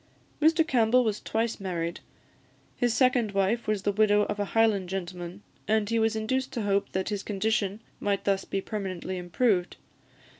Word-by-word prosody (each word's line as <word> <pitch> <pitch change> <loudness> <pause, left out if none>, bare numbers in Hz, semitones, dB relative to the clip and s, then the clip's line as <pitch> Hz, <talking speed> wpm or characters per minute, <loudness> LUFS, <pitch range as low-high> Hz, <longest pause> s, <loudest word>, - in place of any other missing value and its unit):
Mr 320 +1 +4
Campbell 250 -2 +4
was 215 -3 -1
twice 225 +1 -1
married; 170 -3 -3 0.8
his 245 -1 +1
second 245 -3 +2
wife 200 +4 +1
was 210 -2 0
the 205 - +2
widow 210 0 +4
of 205 0 -3
a 205 - +1
Highland 210 -5 +3
gentleman, 180 0 -5 0.2
and 215 -1 +2
he 230 - +2
was 225 0 +2
induced 260 +4 -1
to 230 - -2
hope 200 0 0
that 190 +1 -1
his 205 -2 -2
condition 210 0 -1 0.2
might 200 -1 -1
thus 195 -1 +1
be 195 - -3
permanently 190 -3 -4
improved. 180 +1 0
205 Hz, 165 wpm, -27 LUFS, 195-225 Hz, 0.8 s, Mr